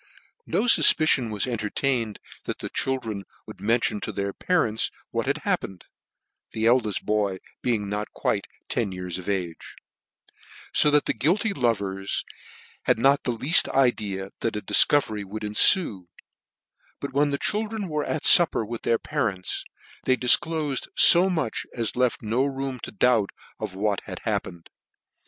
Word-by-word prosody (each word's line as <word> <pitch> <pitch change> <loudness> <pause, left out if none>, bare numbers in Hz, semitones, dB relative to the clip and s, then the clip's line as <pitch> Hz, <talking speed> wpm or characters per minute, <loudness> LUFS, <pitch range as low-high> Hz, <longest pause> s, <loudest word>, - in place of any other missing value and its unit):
No - - 0
fufpicion 155 - +4
was 105 - 0
entertained 115 0 -2 0.3
that - - -4
the - - -7
children 115 -7 -3 0.2
would. - - -12
mention 115 0 0
to - - -5
their 100 0 -4
parents 115 -12 0 0.2
what - - -3
had - - 0
happen 95 - -1
ed; - - -20 0.7
the 110 0 -2
eldeft 115 -4 +1
boy 105 -3 0 0.2
being 110 -5 -1
not 105 +1 -4
quite - - -2 0.2
ten 110 -5 -2
years 90 -1 -5
of 90 - -7
age: 90 -4 -4 1.0
fo 150 - +4
that 150 0 +2
the - - 0
guilty 180 - 0
lovers 100 - -2 0.6
had - - +2
not 135 +4 +2
the 125 - 0
leafl 130 +8 +4
idea 105 -7 0
that 115 -2 -2
a 105 - -3
difcovery 110 -2 +4
would 105 +2 -8
enfue; 105 - +4 0.9
but - - -6
when 145 +1 +2
the 140 - -1
chil 210 +8 -1
dren 210 -2 -5
were 150 -2 -2
at 155 - -4
iupper 165 -10 +5
with 115 +1 -6
their 115 - +1
parents, 95 -5 -3 0.4
they 130 - +3
dif 125 -1 +6
clofed 155 -4 -3
fo 180 +2 +8
much 160 -10 -3
as 115 -3 -2
left 125 -2 0
no 115 +5 0
room 135 -2 -4
to - - -8
doubt 110 -1 +2 0.3
of - - -6
what 100 0 -1
had - - -7
happened. 85 -1 -4
115 Hz, 160 wpm, -24 LUFS, 105-140 Hz, 1.0 s, fo